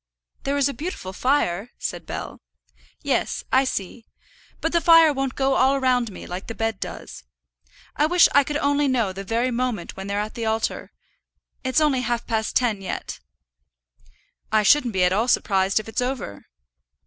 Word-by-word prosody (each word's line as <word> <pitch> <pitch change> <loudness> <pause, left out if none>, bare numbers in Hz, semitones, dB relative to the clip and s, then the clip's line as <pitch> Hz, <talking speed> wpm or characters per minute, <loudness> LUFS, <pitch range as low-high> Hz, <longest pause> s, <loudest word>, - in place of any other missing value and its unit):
"There's 280 0 +2
a 280 - -3
beautiful 295 - -6
fire," 230 -4 0
said - - -5
Bell. - - -6 0.6
"Yes; - - -1
I 265 +1 +5
see. 225 -1 -5 0.5
But 325 - -1
the 340 - +2
fire 330 -3 +7
won't 270 -1 -2
go 270 0 +1
all 265 +1 +3
around 250 -4 +1
me, - - -10
like 180 +2 -6
the 225 - -6
bed 225 -3 -2
does. - - -7 0.7
I 300 - +2
wish 355 +1 +6
I 285 - +6
could 295 +2 -5
know 280 -8 +1
the 195 +1 -6
very 230 +5 0
moment 240 -6 -2
when 195 0 -7
they're 200 +1 -1
at 210 +1 -4
the 230 -1 -3
altar. 220 0 -2 0.7
It's 260 +3 +2
only 295 -4 +2
half 240 -1 -2
past 220 -2 -2
ten 225 -6 +1
yet." 190 - -5 1.3
"I 215 -1 +3
shouldn't 250 -1 +4
be 185 -1 +2
at 180 0 +3
all 220 +5 +1
surprised 195 -4 +2
if 215 - -8
it's 225 - -2
over." 250 - -4
245 Hz, 170 wpm, -23 LUFS, 210-275 Hz, 1.3 s, fire